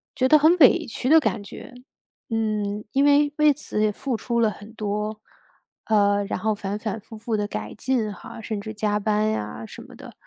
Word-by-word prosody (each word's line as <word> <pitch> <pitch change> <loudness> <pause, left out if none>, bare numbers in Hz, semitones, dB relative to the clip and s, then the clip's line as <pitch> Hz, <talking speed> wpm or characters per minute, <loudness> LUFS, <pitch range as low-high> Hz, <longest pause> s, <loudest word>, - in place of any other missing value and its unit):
觉 260 - +2
得 305 - +7
很 320 +4 +5
委 280 -7 +6
屈 250 +3 -3
的 320 - +8
感 230 -8 -1
觉。 205 - -11 0.6
嗯， 210 -2 -2
因 275 +4 +2
为， 290 0 +4
为 300 -1 +5
此 260 -6 -4
也 215 - +2
付 250 +4 -3
出 235 0 -2
了 220 -2 +3
很 210 +2 -12
多， 210 0 -3 0.6
呃， 205 -2 +3
然 195 - -3
后 215 +2 0
反 200 0 -4
反 215 -1 -4
复 220 +1 -12
复 225 +1 -3
地 205 - -1
改 105 - -6
进 235 -5 -1
哈， 200 - -10
甚 215 -2 -4
至 215 +1 -7
加 210 -1 0
班 215 +1 +1
呀 110 - -4
什 - - -11
么 - - -14
的。 - - -12
215 Hz, 220 characters per minute, -24 LUFS, 205-245 Hz, 0.6 s, 的